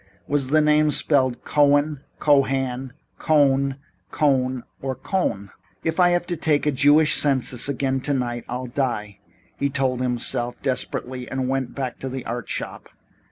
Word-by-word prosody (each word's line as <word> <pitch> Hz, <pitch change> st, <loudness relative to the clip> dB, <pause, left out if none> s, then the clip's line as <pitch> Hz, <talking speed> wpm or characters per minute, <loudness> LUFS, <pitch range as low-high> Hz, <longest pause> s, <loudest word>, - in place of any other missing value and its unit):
Was 140 Hz, -2 st, 0 dB
the 155 Hz, +3 st, +3 dB
name 150 Hz, 0 st, +4 dB
spelled 130 Hz, -4 st, +1 dB
Cohen, 145 Hz, 0 st, +2 dB, 0.2 s
Cohan, 135 Hz, -3 st, +1 dB, 0.3 s
Cohn, 140 Hz, -3 st, +2 dB, 0.3 s
Kohn 130 Hz, -4 st, +1 dB, 0.2 s
or 130 Hz, -1 st, -3 dB
Coen? 100 Hz, -, -2 dB, 0.3 s
"If 160 Hz, +2 st, -1 dB
I 180 Hz, -1 st, +6 dB
have 175 Hz, 0 st, +1 dB
to 175 Hz, -1 st, -3 dB
take 150 Hz, -2 st, +1 dB
a 150 Hz, -, +3 dB
Jewish 145 Hz, +3 st, +4 dB
census 130 Hz, -2 st, +2 dB
again 135 Hz, -1 st, -1 dB
tonight 125 Hz, -4 st, -1 dB
I'll 125 Hz, +1 st, -4 dB
die," 120 Hz, -6 st, -3 dB, 0.4 s
he 140 Hz, -, 0 dB
told 130 Hz, -2 st, -1 dB
himself 120 Hz, -1 st, -1 dB
desperately, 130 Hz, -1 st, -3 dB
and 130 Hz, -1 st, -2 dB
went 135 Hz, -1 st, -2 dB
back 130 Hz, -3 st, -4 dB
to 130 Hz, -, -4 dB
the 130 Hz, 0 st, -6 dB
art 120 Hz, -1 st, -5 dB
shop. -, -, -5 dB
135 Hz, 150 wpm, -23 LUFS, 125-145 Hz, 0.4 s, I